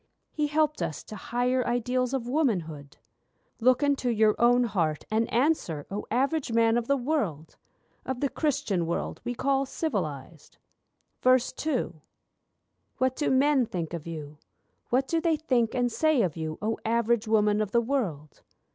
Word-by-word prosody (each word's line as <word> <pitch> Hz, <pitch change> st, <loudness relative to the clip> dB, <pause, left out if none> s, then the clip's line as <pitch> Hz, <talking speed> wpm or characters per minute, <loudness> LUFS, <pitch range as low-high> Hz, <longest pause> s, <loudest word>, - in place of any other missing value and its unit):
He 300 Hz, -1 st, 0 dB
helped 300 Hz, -4 st, +1 dB
us 165 Hz, -3 st, -3 dB
to 215 Hz, -, -9 dB
higher 250 Hz, +3 st, 0 dB
ideals 250 Hz, +1 st, 0 dB
of 260 Hz, -3 st, -2 dB
womanhood'? 175 Hz, -, -1 dB, 0.6 s
Look 255 Hz, +3 st, +3 dB
into 280 Hz, -3 st, +1 dB
your 215 Hz, -2 st, +3 dB
own 245 Hz, +1 st, +5 dB
heart 170 Hz, -9 st, -1 dB
and 225 Hz, +1 st, +1 dB
answer, 235 Hz, -, +1 dB
O 205 Hz, +1 st, -4 dB
Average 270 Hz, +3 st, 0 dB
Man 230 Hz, 0 st, +4 dB
of 240 Hz, -1 st, -1 dB
the 280 Hz, -, +2 dB
world, 230 Hz, -, -2 dB, 0.5 s
Of 260 Hz, -1 st, -4 dB
the 280 Hz, -, +1 dB
Christian 205 Hz, -, -1 dB
world 170 Hz, -, -3 dB
we 245 Hz, -, -3 dB
call 275 Hz, +1 st, +1 dB
civilised. 165 Hz, -, -4 dB, 0.7 s
II 255 Hz, -, +1 dB, 1.0 s
What 260 Hz, 0 st, +1 dB
do 295 Hz, -, 0 dB
men 265 Hz, -1 st, +3 dB
think 170 Hz, -4 st, -4 dB
of 170 Hz, -1 st, -6 dB
you, 150 Hz, -2 st, -7 dB, 0.5 s
what 265 Hz, +2 st, +1 dB
do 330 Hz, -1 st, 0 dB
they 325 Hz, -2 st, +2 dB
think 250 Hz, -7 st, 0 dB
and 245 Hz, -1 st, +1 dB
say 310 Hz, -1 st, +2 dB
of 170 Hz, -6 st, -1 dB
you, 160 Hz, -1 st, -4 dB
O 220 Hz, +1 st, -1 dB
Average 235 Hz, 0 st, +1 dB
Woman 210 Hz, -1 st, +3 dB
of 210 Hz, -, -1 dB
the 235 Hz, -, +3 dB
world? 215 Hz, -, -3 dB
235 Hz, 155 wpm, -27 LUFS, 185-265 Hz, 1.0 s, own